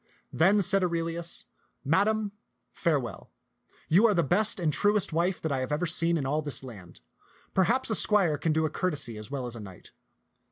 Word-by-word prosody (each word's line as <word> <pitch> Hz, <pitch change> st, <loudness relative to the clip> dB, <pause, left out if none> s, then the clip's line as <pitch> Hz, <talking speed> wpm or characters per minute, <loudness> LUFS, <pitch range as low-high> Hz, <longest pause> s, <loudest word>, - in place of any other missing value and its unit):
Then 195 Hz, +5 st, +3 dB
said 195 Hz, 0 st, +3 dB
Aurelius, 170 Hz, -1 st, -1 dB, 0.2 s
" -, -, -43 dB
Madam, 215 Hz, +1 st, +1 dB, 0.4 s
farewell. 145 Hz, -9 st, -2 dB, 0.6 s
You 195 Hz, +8 st, +5 dB
are 210 Hz, -, +1 dB
the 170 Hz, -, +2 dB
best 200 Hz, +7 st, +1 dB
and 160 Hz, -4 st, 0 dB
truest 205 Hz, -2 st, +2 dB
wife 175 Hz, +3 st, 0 dB
that 160 Hz, -, -3 dB
I 135 Hz, -, -1 dB
have 130 Hz, +2 st, -4 dB
ever 150 Hz, +4 st, 0 dB
seen 170 Hz, 0 st, +1 dB
in 140 Hz, -, -3 dB
all 150 Hz, +3 st, 0 dB
this 145 Hz, -4 st, -2 dB
land. 100 Hz, -, -12 dB, 0.5 s
Perchance 230 Hz, +6 st, +1 dB
a -, -, +2 dB
squire 195 Hz, -9 st, +3 dB
can 165 Hz, -, 0 dB
do 160 Hz, +1 st, +1 dB
a -, -, -1 dB
courtesy 145 Hz, -12 st, 0 dB
as 105 Hz, -, -9 dB
well 135 Hz, -2 st, -4 dB
as 120 Hz, -1 st, -5 dB
a -, -, -8 dB
knight. 95 Hz, -4 st, -11 dB
165 Hz, 195 wpm, -27 LUFS, 140-195 Hz, 0.6 s, You